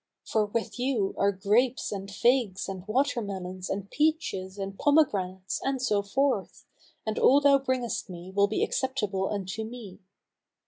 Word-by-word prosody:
For 215 -2 +1
with 230 +3 -3
you 245 -6 0
are 200 0 +4
grapes 215 +6 +1
and 195 -1 -5
figs 220 -2 +1
and 190 -1 -6
water 255 +2 +1
melons 185 -2 -5
and 195 0 -3
peaches 295 - 0
and 195 0 -4
pomegranates 195 -11 +1
and 270 -1 0
so 210 -5 +1
forth, 215 +1 -1 0.4
and 220 0 -2
all 275 - +6
thou 280 -1 +5
bringest 255 -5 -2
me 180 +1 -8
will 200 0 +5
be - - 0
acceptable 210 -8 -1
unto 200 +1 -3
me. 220 -4 -9
210 Hz, 150 wpm, -28 LUFS, 195-260 Hz, 0.4 s, all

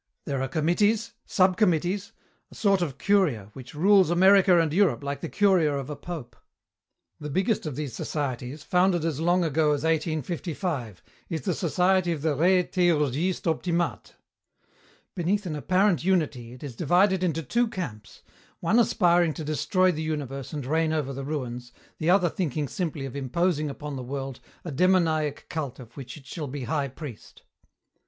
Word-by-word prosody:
There 140 -3 -2
are 135 - -1
committees, 205 - +1
subcommittees, 185 +1 +2 0.4
a - - -14
sort 195 -3 +2
of 145 -6 -2
curia, 145 - +1
which 130 +2 -11
rules 190 +2 +5
America 185 0 +5
and 160 -2 +1
Europe, 165 - +2
like 140 0 -4
the - - -4
curia 185 -8 +3
of 140 +1 -5
a - - -4
pope. 145 -8 -8 0.8
"The 150 - -6
biggest 190 - 0
of 145 - -4
these 145 -4 -4
societies 140 +1 -4
founded 180 -1 +2
as 155 -4 -1
long 175 +2 +2
ago 155 -1 +2
as 145 0 -2
1855 160 - -2 0.3
is 160 -3 -3
the - - -1
society 180 +1 +1
of 150 -3 -6
the 160 -2 +2
Re 180 +5 +3
Theurgistes 170 -1 +1
Optimates. 170 +1 -1 1.0
Beneath 195 +3 -1
an 160 -4 -3
apparent 185 +1 +2
unity 150 -10 0
it 125 - -12
is 135 -5 -7
divided 185 - +3
into 165 -2 0
two 240 - +1
camps, 115 - -7 0.4
one 205 +8 +2
aspiring 175 -7 +3
to 160 - -5
destroy 185 +5 +2
the 155 -2 -4
universe 140 -4 -4
and 145 -5 -5
reign 160 +3 +1
over 145 -3 -1
the 135 +1 -5
ruins, 125 -4 -5 0.3
the 160 - 0
other 180 -1 +5
thinking 150 -4 -2
simply 155 -3 -3
of 135 - -7
imposing 150 +3 0
upon 145 0 -6
the - - -5
world 135 0 -5 0.3
a 165 - -4
demoniac 160 -3 +1
cult 150 -6 -4
of 120 -3 -13
which 130 0 -8
it 140 - -15
shall 150 +2 -5
be 140 0 -5
high 140 +3 -1
priest. 135 -3 -10
160 Hz, 165 wpm, -26 LUFS, 140-180 Hz, 1.0 s, rules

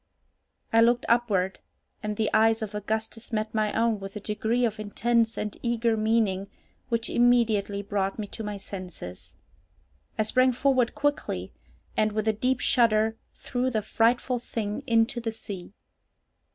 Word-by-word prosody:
I 225 - +6
looked 240 +1 +3
upward, 210 -6 +1 0.4
and 210 -1 -3
the 220 -1 0
eyes 225 0 +4
of 210 -1 -5
Augustus 220 +2 -3
met 215 -1 -2
my 215 -1 +1
own 225 -1 +1
with 195 +1 -8
a - - -3
degree 220 +4 0
of 215 -2 -2
intense 225 +2 +1
and 210 - -3
eager 235 -1 +1
meaning 215 -3 +1 0.4
which 230 -1 0
immediately 225 -5 +2
brought 195 -1 -1
me 215 - -3
to 220 +2 -6
my 210 -1 -4
senses. 180 - -8 0.8
I 215 - +3
sprang 255 +4 +3
forward 255 -1 +2
quickly, 290 0 -1 0.4
and, 215 0 +2
with 215 0 -1
a 220 - +4
deep 250 +4 0
shudder, 220 -2 +3 0.2
threw 250 +1 -2
the 220 -4 -1
frightful 240 +3 +1
thing 215 -1 -4
into 230 +1 +2
the 225 -1 -2
sea. 195 -5 -8
220 Hz, 150 wpm, -27 LUFS, 210-235 Hz, 0.8 s, I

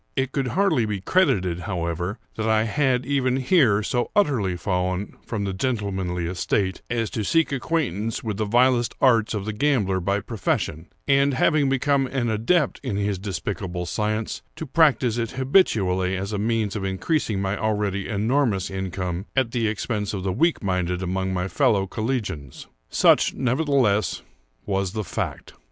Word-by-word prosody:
It 135 -1 0
could 135 -2 -1
hardly 180 - +2
be 105 -2 -2
credited, 95 - +1
however, 90 +1 -3 0.2
that 110 0 -1
I 110 0 +3
had, 130 +1 +1
even 130 -2 +1
here, 130 - +3
so 120 +3 -1
utterly 120 - +2
fallen 90 +1 -2
from 110 -3 -2
the 100 -1 -2
gentlemanly 95 -6 -2
estate, 95 +2 -1
as 115 -3 -1
to 110 - -2
seek 165 - +2
acquaintance 125 - -1
with 105 -4 -3
the 110 - 0
vilest 120 +2 +3
arts 115 -5 +3
of 100 -2 -3
the 110 - -3
gambler 105 -7 +1
by 100 +3 0
profession, 95 -6 -2 0.2
and, 140 0 +3
having 145 +1 +3
become 135 0 +2
an 125 -3 -1
adept 135 +9 +1
in 125 -7 -3
his 100 -1 -1
despicable 90 -2 -4
science, 110 +3 -2
to 160 - -5
practise 130 -5 +3
it 115 -2 -3
habitually 100 - +2
as 100 +3 -4
a 105 - -1
means 110 -1 0
of 105 - -3
increasing 100 - -1
my 95 0 -1
already 105 -3 -1
enormous 110 -2 +1
income 95 -1 -4
at 130 -4 +1
the 115 -2 0
expense 105 -1 -2
of 95 - -4
the 95 -1 -1
weak 165 - +1
minded 90 -1 -1
among 95 +1 -1
my 90 0 -1
fellow 110 -4 +2
collegians. 105 - -4 0.2
Such, - - +4
nevertheless, 130 - +1 0.4
was 95 -2 -1
the 110 -1 -2
fact. 90 - -5
110 Hz, 160 wpm, -24 LUFS, 95-130 Hz, 0.4 s, Such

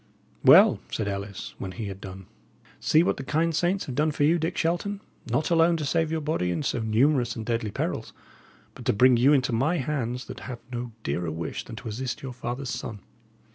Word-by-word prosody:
"Well," - - +8
said 110 - -2
Ellis, 100 0 -5
when 95 -1 -5
he 115 +1 -5
had 100 -1 -7
done, 95 -1 -9 0.5
"see 155 +2 +4
what - - 0
the 135 - -5
kind 160 +4 +1
saints 175 +4 +1
have 130 - -5
done 150 +4 +2
for 145 -1 -1
you, 165 +4 +4
Dick 165 +2 -2
Shelton, 175 +5 0 0.3
not 150 +9 0
alone 165 0 +4
to 155 - -3
save 160 +2 +1
your 160 -1 -1
body 145 - -1
in 90 - -1
so 125 - -1
numerous 120 +2 +2
and 110 - -5
deadly 115 -2 -1
perils, - - -3 0.6
but - - -11
to - - +3
bring 125 +4 +6
you 125 +4 +5
into 130 -4 +3
my 145 +10 +2
hands 125 -3 -2
that - - -8
have 125 - -5
no 120 -1 -4
dearer 80 +4 -2
wish 80 +1 -4
than 115 - -8
to 115 - -8
assist 120 +4 -4
your 130 -2 -5
father's 125 +1 -4
son. 105 -3 -5
125 Hz, 215 wpm, -26 LUFS, 110-155 Hz, 0.6 s, Well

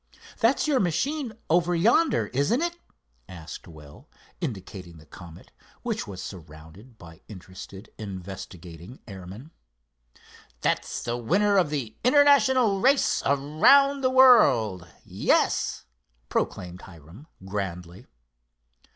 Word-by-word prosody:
That's 240 +6 +2
your 285 -4 +2
machine 245 - -1
over 175 +2 +2
yonder; 210 - +2
isn't 145 - +1
it?" 345 0 -2 0.5
asked 85 -4 -10
Will, 75 - -15 0.3
indicating 95 - -7
the 80 - -16
Comet, 85 +2 -14 0.3
which - - -3
was 95 -2 -8
surrounded 85 +7 -12
by 80 -3 -15
interested 95 +1 -12
investigating 95 0 -9
airmen. 100 - -10 1.1
"That's - - -2
the 120 0 -3
winner 200 - +1
of 185 -6 +3
the 135 -7 -5
international 260 -5 +4
race 270 +2 +2
around 255 - +4
the 255 - +2
world, 140 - +4 0.2
yes," - - 0 0.4
proclaimed 90 -1 -3
Hiram 85 - -15 0.2
grandly. 95 0 -6
120 Hz, 105 wpm, -25 LUFS, -, 1.1 s, international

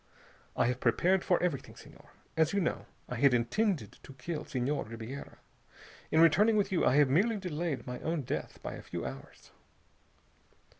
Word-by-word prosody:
I - - +3
have 125 +1 0
prepared 175 +11 +2
for 180 - +2
everything, 145 -7 -2
Senhor. - - -15 0.3
As 160 +1 +2
you 200 - +2
know, 175 - -2 0.2
I 125 - -4
had 135 0 +5
intended 130 - 0
to 135 - -12
kill 150 +4 -5
Senhor 140 +1 -1
Ribiera. 115 +5 -8 0.7
In 160 - +4
returning 210 +7 +5
with 205 - +1
you 185 - +1
I 130 - +4
have 145 -1 +6
merely 205 - +2
delayed 170 -6 -3
my 125 0 -5
own 160 -2 -2
death - - -4
by - - -4
a - - -8
few - - -6
hours." - - -9
150 Hz, 170 wpm, -31 LUFS, 125-180 Hz, 0.7 s, have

